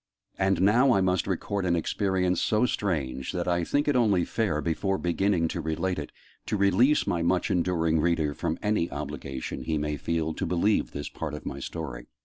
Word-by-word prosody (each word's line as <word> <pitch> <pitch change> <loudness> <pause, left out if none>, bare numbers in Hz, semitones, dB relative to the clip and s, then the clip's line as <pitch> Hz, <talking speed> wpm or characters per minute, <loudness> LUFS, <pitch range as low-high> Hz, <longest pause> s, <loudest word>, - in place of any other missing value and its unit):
And 95 -1 +2
now 120 +7 +5
I 95 - +3
must 90 -1 +1
record 100 +1 -2
an 90 -2 +2
experience 90 +1 0
so 110 +3 +2
strange, 70 - -2
that 90 -2 -2
I 85 -1 +1
think 145 - 0
it 145 - +2
only 105 -8 +3
fair, 105 -10 -1
before 95 +5 -1
beginning 90 -1 +1
to 85 - -3
relate 80 +3 -1
it, 75 - -6 0.4
to 105 - 0
release 100 +9 +4
my 85 - 0
much 90 +2 +1
enduring 85 -3 +1
reader 80 -2 +1
from 80 +3 -2
any 105 -5 +1
obligation 65 -2 -5
he 80 -1 -1
may 75 0 -2
feel 80 0 -1
to - - -3
believe 90 +5 +1
this 75 - -5
part - - -5
of - - -9
my - - -5
story. 60 -7 -6
90 Hz, 190 wpm, -27 LUFS, 80-100 Hz, 0.4 s, now